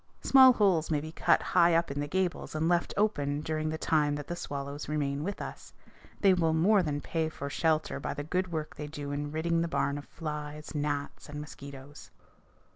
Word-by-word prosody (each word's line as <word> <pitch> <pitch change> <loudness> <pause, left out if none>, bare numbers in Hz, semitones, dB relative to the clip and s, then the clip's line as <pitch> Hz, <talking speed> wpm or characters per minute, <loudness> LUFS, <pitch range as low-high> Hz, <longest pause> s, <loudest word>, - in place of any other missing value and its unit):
Small 260 -1 +8
holes 190 -8 +2
may 155 -2 +1
be 155 +2 -7
cut - - +2
high 170 -1 +4
up 170 -3 +1
in 140 - -3
the 145 - -2
gables 180 0 -2
and 155 +1 +1
left 175 0 +2
open 145 -9 +1
during 155 0 -2
the 160 - -2
time 150 -2 +2
that 145 -1 -5
the 175 - -4
swallows 140 -2 -5
remain 145 -1 -1
with 200 +3 -4
us. - - -8 0.5
They 195 -2 +6
will 165 -3 +2
more 195 +5 +4
than 145 -4 -2
pay 160 -1 -1
for 140 -2 -6
shelter 155 0 0
by - - -4
the 145 - -4
good 180 +4 -1
work 155 -2 -4
they 150 - -6
do 145 -1 -6
in 145 +1 -3
ridding 165 +2 0
the 170 - 0
barn 140 -1 0
of 145 - -11
flies, 150 -1 -6
gnats, 145 -1 -3
and 150 0 -6
mosquitoes. 140 -1 -10
155 Hz, 205 wpm, -30 LUFS, 145-170 Hz, 0.5 s, Small